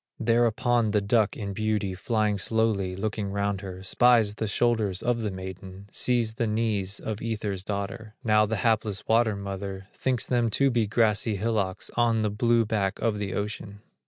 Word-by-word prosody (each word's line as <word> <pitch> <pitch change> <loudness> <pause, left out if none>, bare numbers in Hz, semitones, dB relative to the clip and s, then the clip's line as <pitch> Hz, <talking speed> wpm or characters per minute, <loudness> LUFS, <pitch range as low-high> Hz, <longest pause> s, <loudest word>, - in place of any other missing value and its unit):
Thereupon 120 0 +2
the 105 0 +2
duck 105 +1 +1
in 100 -2 -4
beauty, 105 -2 -1
Flying 105 +1 0
slowly, 105 -4 +1
looking 105 0 -3
round 100 -1 -1
her, 95 -2 -8
Spies 115 0 +4
the 110 +1 -3
shoulders 110 -4 0
of 120 -1 0
the 110 - -1
maiden, 95 +1 -8
Sees 120 -3 +1
the 115 0 -1
knees 105 -3 -1
of 110 -1 -5
Ether's 105 -4 -3
daughter, 105 +2 -5
Now 105 -1 +4
the 110 - -1
hapless 110 -3 0
water 110 -1 +3
mother, 100 0 -6
Thinks 130 -3 0
them 120 -2 +1
to 140 -1 +3
be 115 -3 +1
grassy 110 0 +2
hillocks, 100 -2 -2
On 115 -2 +2
the 105 - 0
blue 115 +2 +2
back 105 -3 -1
of 110 -3 -1
the 100 -2 -3
ocean. 105 0 -5
105 Hz, 170 wpm, -26 LUFS, 100-115 Hz, -, Spies